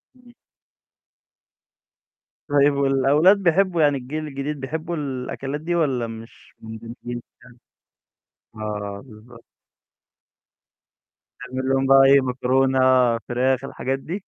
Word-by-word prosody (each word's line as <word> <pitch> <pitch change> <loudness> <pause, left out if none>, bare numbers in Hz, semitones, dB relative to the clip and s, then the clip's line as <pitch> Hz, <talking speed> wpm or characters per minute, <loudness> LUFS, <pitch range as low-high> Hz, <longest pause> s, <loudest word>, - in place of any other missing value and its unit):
إمم. 250 -1 -20 2.1
طيب 145 0 +3
والأولاد 140 +7 +3
بيحبوا 180 -2 +1
يعني 145 -2 +3
الجيل 150 +5 -6
الجديد 140 +1 -5
بيحبوا 160 +5 -4
الأكلات 135 0 -5
دي 175 +2 -2
والّا 135 -8 0
مش 115 0 -12
مندمجين 115 +2 -8 1.3
فيها؟ 110 - -9
آه، 105 -1 -5
بالضبط. 115 0 -16 2.0
تعمل 130 +1 -4
لهم 135 0 +1
بقى 135 0 +7
إيه، 140 +1 +6
مكرونة، 130 +1 +1 0.4
فراخ، 125 +2 -1
الحاجات 135 0 -3
دي؟ 170 +7 -5
135 Hz, 100 wpm, -22 LUFS, 125-150 Hz, 2.1 s, بقى